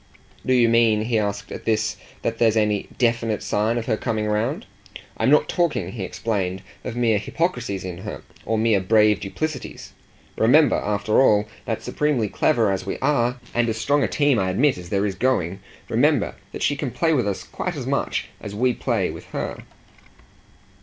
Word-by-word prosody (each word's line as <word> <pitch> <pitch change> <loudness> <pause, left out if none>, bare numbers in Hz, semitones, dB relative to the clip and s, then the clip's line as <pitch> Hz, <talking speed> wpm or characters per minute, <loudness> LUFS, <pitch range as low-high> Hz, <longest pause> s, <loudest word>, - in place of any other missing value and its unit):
"Do 130 - +1
you 120 -2 +5
mean," 115 -2 +3
he 115 0 +1
asked 100 -1 -3
at - - -7
this, 110 -2 +1 0.3
"that 115 0 -2
there's 115 -1 +3
any 105 -2 +1
DEFINITE 115 -3 +1
sign 110 +3 0
of 115 - -2
her 110 -3 0
coming 110 -3 -2
round? 115 - -1 0.5
I'm - - +2
not 485 - +5
talking," 130 - 0
he 110 - -6
explained, 95 -2 -2 0.2
"of 125 - -5
mere 115 -4 +2
hypocrisies 125 - -2
in 90 -2 -6
her, - - -7 0.2
or 110 - -1
mere 110 -2 +3
brave 105 +2 +4
duplicities. 155 +10 -5 0.5
Remember, 140 +5 +5
after 105 +3 +1
all, 105 -5 +4 0.2
that - - -3
supremely 140 -8 0
clever 115 -6 +2
as 95 - -2
we - - -4
are, 125 -3 +1
and 120 -1 +1
as 110 - -2
strong 145 +6 +2
a - - +2
team, 145 -5 +2
I 95 -1 0
admit, 130 +9 +3
as 85 -1 -10
there 100 +1 +1
is 100 - -1
going 95 -5 0 0.3
remember - - +2 0.2
that - - -5
she 145 - +2
can 140 -1 -3
play 160 +6 +1
with 125 -8 +1
us 100 - -2
quite - - -4
as - - -5
much - - -1
as 100 -1 -7
we 125 +3 +2
play - - -1
with - - -10
her." - - -5
115 Hz, 185 wpm, -23 LUFS, 105-125 Hz, 0.5 s, you